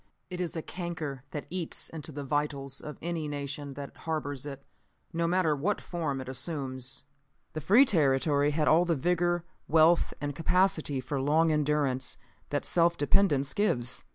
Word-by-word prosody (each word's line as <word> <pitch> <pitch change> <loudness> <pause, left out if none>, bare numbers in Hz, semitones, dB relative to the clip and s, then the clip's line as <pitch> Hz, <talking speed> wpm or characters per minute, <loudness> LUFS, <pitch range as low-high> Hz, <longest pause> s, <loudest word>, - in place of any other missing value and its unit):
It 180 0 -3
is 175 -1 -3
a 160 - -3
canker 165 -7 -5
that 150 - -5
eats 180 -3 -2
into 155 -1 -7
the 145 0 -5
vitals 140 -1 -1
of 150 - -8
any 165 -2 -2
nation 145 -1 -5
that 140 0 -8
harbors 145 -4 -3
it, 140 -1 -8 0.5
no 170 0 0
matter 170 -3 +2
what 180 +9 0
form 155 -6 -3
it 130 - -7
assumes. 130 -1 -3 0.5
The 155 - -4
free 215 - +6
territory 145 - +3
had 150 +1 0
all 165 +3 +6
the 170 -2 +1
vigor, 175 +3 +1 0.2
wealth 165 +2 +4
and 145 -1 -3
capacity 165 -5 +1
for 135 +1 -3
long 160 +4 +3
endurance 145 -4 0 0.3
that 145 - -1
self 170 0 +3
dependence 145 -4 +3
gives. 130 - 0
150 Hz, 160 wpm, -29 LUFS, 140-170 Hz, 0.5 s, free